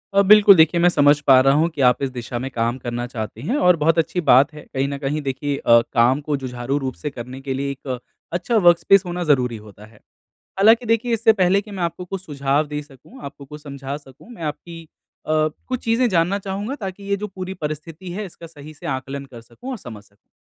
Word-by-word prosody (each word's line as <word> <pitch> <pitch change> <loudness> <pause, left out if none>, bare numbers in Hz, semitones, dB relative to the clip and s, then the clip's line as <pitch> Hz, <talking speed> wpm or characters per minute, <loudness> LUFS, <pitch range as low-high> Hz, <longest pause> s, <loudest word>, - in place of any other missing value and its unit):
अ, 200 - +6
बिल्कुल 205 0 +7
देखिए 160 +1 +4
मैं 175 - +5
समझ 145 -2 +4
पा 130 -1 +8
रहा 135 +1 +4
हूँ 165 - +2
कि 140 - -2
आप 125 0 +3
इस 135 - 0
दिशा 120 0 -5
में 130 - -4
काम 120 +1 -1
करना 120 0 -4
चाहती 110 -4 -7
हैं 250 - 0
और 180 -6 +4
बहुत 165 +2 +3
अच्छी 175 +2 -1
बात 140 -2 +5
है। 150 - -10
कहीं 135 +1 0
न 140 0 -4
कहीं 145 +2 -3
देखिए 140 +1 -3
अ, 115 0 +5
काम 120 +4 +3
को 150 0 -2
जुझारू 125 +2 -3
रूप 130 -2 -3
से 150 - -5
करने 125 +1 -9
के 135 -1 -4
लिए 140 +1 -2
एक 130 -2 -6 0.3
अच्छा 200 +7 0
वर्कस्पेस 175 +3 +5
होना 175 0 -3
ज़रूरी 125 -5 +2
होता 105 0 -14
है। 110 -1 -20 0.6
हालाँकि 225 +4 +5
देखिए 230 +2 +1
इससे 225 0 +4
पहले 195 -1 +2
कि 210 - -14
मैं 190 -3 -5
आपको 170 +2 -3
कुछ 190 +1 -7
सुझाव 140 -1 0
दे 150 0 -5
सकूँ, 145 - -17
आपको 140 0 -9
कुछ 150 +2 -11
समझा 140 -1 -6
सकूँ 145 - -16
मैं 230 -8 -11
आपकी 165 +2 -6 0.4
अ, 155 - -1 0.4
कुछ 255 -1 -2
चीज़ें 230 +2 +2
जानना 185 +1 +1
चाहूँगा 200 +6 -4
ताकि 195 -1 -6
ये 200 0 -1
जो - - -1
पूरी 190 -1 -7
परिस्थिति 155 +4 -6
है 210 +4 -4
इसका 170 -2 -12
सही 155 -1 -13
से 145 - -11
आकलन 135 +1 -4
कर 125 -4 -12
सकूँ 245 - -11
और 260 - -4
समझ 115 - -10
सकूँ। 100 -1 -32
150 Hz, 230 wpm, -21 LUFS, 135-185 Hz, 0.6 s, पा